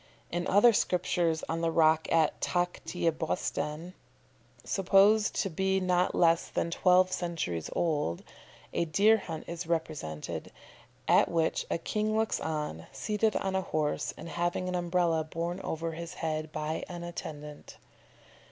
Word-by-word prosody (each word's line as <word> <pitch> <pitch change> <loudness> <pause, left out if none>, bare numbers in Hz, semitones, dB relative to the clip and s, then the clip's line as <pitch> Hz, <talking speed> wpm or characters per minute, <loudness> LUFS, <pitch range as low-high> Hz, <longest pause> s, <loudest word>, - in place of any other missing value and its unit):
In 175 +1 -2
other 215 +4 +6
sculptures 175 -4 +1
on 165 +1 -2
the 165 - +1
rock 160 -1 +3
at 160 -2 +2
Takht 175 0 -2
i 170 -1 +2
Bostan, 155 +1 -3 0.7
supposed 200 +3 +4
to - - 0
be 190 +3 +1
not 180 -1 +1
less 165 -1 +3
than 170 - -2
twelve 185 +1 +4
centuries 165 - -3
old, 150 - -1 0.5
a 170 - +1
deer 205 +8 +4
hunt 165 -6 -6
is 170 0 -6
represented, 155 - -3 0.6
at - - +5
which 165 -1 0
a - - 0
king 215 +5 -1
looks 220 0 +1
on, 150 - -4
seated 215 0 0
on 190 -1 -1
a 190 - +2
horse, 155 -4 -1
and 160 - -8
having 175 +2 -1
an 180 - -2
Umbrella 175 -2 +1
borne 170 +3 -4
over 165 +1 -3
his 170 +1 -7
head 155 -1 -3
by 155 +1 -3
an 175 -1 -6
attendant. 150 -3 -8
170 Hz, 145 wpm, -30 LUFS, 160-185 Hz, 0.7 s, other